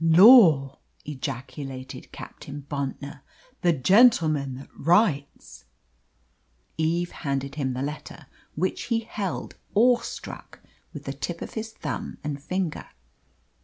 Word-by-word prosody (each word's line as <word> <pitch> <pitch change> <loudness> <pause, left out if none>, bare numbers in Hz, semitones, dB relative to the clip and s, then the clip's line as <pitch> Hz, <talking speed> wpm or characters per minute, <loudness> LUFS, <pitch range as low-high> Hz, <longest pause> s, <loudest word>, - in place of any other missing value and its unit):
'" - - -3
"Lor!" 165 - +7 0.3
ejaculated 135 -1 -6
Captain 140 0 -9
Bontnor, 140 0 -5 0.4
"the 175 - +4
gentleman 155 - +4
that 135 - -11
writes." 165 - +1 1.1
Eve 170 +2 0
handed 140 -2 -3
him 135 -3 -2
the 130 +2 -3
letter, 150 +1 -7 0.3
which 185 +5 -1
he 230 -2 0
held, 205 -4 -5 0.2
awestruck, 240 +3 0 0.3
with - - -9
the - - -4
tip - - -5
of - - -9
his 220 0 -5
thumb - - -5
and 145 -2 -4
finger. 180 +1 -3
150 Hz, 115 wpm, -25 LUFS, 140-185 Hz, 1.1 s, Lor